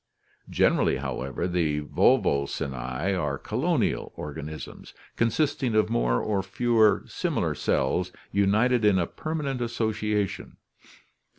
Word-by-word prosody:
Generally, -, -, +2 dB
however, 65 Hz, +7 st, -3 dB
the 85 Hz, -4 st, 0 dB
Volvocinte 70 Hz, -1 st, +1 dB, 0.4 s
are 75 Hz, -6 st, -1 dB
colonial -, -, -1 dB
organisms, 75 Hz, +1 st, -8 dB, 0.2 s
con 115 Hz, -, +2 dB
sisting 135 Hz, -2 st, 0 dB
of 110 Hz, +1 st, +2 dB
more -, -, +2 dB
or 100 Hz, -2 st, 0 dB
fewer 110 Hz, +2 st, +2 dB
similar -, -, -1 dB
cells 90 Hz, 0 st, 0 dB, 0.2 s
united 110 Hz, +5 st, +2 dB
in 105 Hz, -2 st, +4 dB
a 90 Hz, -, +2 dB
permanent 150 Hz, -, -4 dB
association. 110 Hz, -3 st, -2 dB
105 Hz, 105 wpm, -26 LUFS, 80-115 Hz, 0.4 s, in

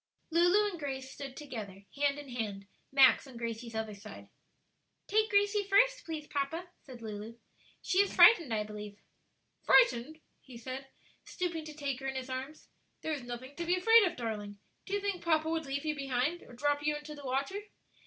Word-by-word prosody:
Lulu 355 Hz, +5 st, +4 dB
and 345 Hz, -, -8 dB
Grace 265 Hz, -2 st, -5 dB
stood 270 Hz, -2 st, -8 dB
together, 215 Hz, -9 st, -7 dB
hand 285 Hz, 0 st, +1 dB
in 290 Hz, -2 st, -9 dB
hand, 210 Hz, -5 st, -4 dB, 0.3 s
Max 270 Hz, 0 st, +6 dB
on 255 Hz, -3 st, -11 dB
Gracie's 230 Hz, 0 st, -5 dB
other 220 Hz, -1 st, -3 dB
side. 205 Hz, +2 st, -11 dB, 0.8 s
"Take 435 Hz, +2 st, +2 dB
Gracie 410 Hz, 0 st, +3 dB
first, -, -, +3 dB
please, 315 Hz, -2 st, -5 dB
papa," 310 Hz, +5 st, -3 dB
said 250 Hz, -4 st, -12 dB
Lulu; 215 Hz, +1 st, -7 dB, 0.5 s
"she 380 Hz, 0 st, +1 dB
is 400 Hz, -, +4 dB
frightened, 340 Hz, -, +7 dB
I 215 Hz, -1 st, +1 dB
believe." 210 Hz, -1 st, -8 dB, 0.6 s
"Frightened?" 315 Hz, -, +4 dB, 0.2 s
he 255 Hz, -3 st, -12 dB
said, 260 Hz, +3 st, -6 dB, 0.4 s
stooping 340 Hz, -3 st, -3 dB
to 305 Hz, -1 st, -8 dB
take 280 Hz, -3 st, -3 dB
her 270 Hz, -, -5 dB
in 265 Hz, -, -3 dB
his 260 Hz, 0 st, -4 dB
arms; 265 Hz, +4 st, -6 dB, 0.4 s
"there 315 Hz, -, -1 dB
is 290 Hz, -, -3 dB
nothing 245 Hz, +3 st, -8 dB
to 345 Hz, -, -2 dB
be 350 Hz, +2 st, +2 dB
afraid 450 Hz, +4 st, +6 dB
of, 350 Hz, -2 st, -1 dB
darling. 210 Hz, -3 st, -4 dB, 0.3 s
Do 395 Hz, -, -5 dB
you 405 Hz, -, -1 dB
think 395 Hz, -3 st, -2 dB
papa 315 Hz, -2 st, +2 dB
would 320 Hz, -2 st, -1 dB
leave 280 Hz, +2 st, -3 dB
you 305 Hz, -1 st, 0 dB
behind 275 Hz, +4 st, -1 dB
or -, -, -14 dB
drop 290 Hz, +3 st, 0 dB
you 300 Hz, 0 st, +1 dB
into 295 Hz, +1 st, -7 dB
the 290 Hz, -1 st, -11 dB
water?" 275 Hz, +9 st, -1 dB
280 Hz, 190 wpm, -32 LUFS, 245-340 Hz, 0.8 s, frightened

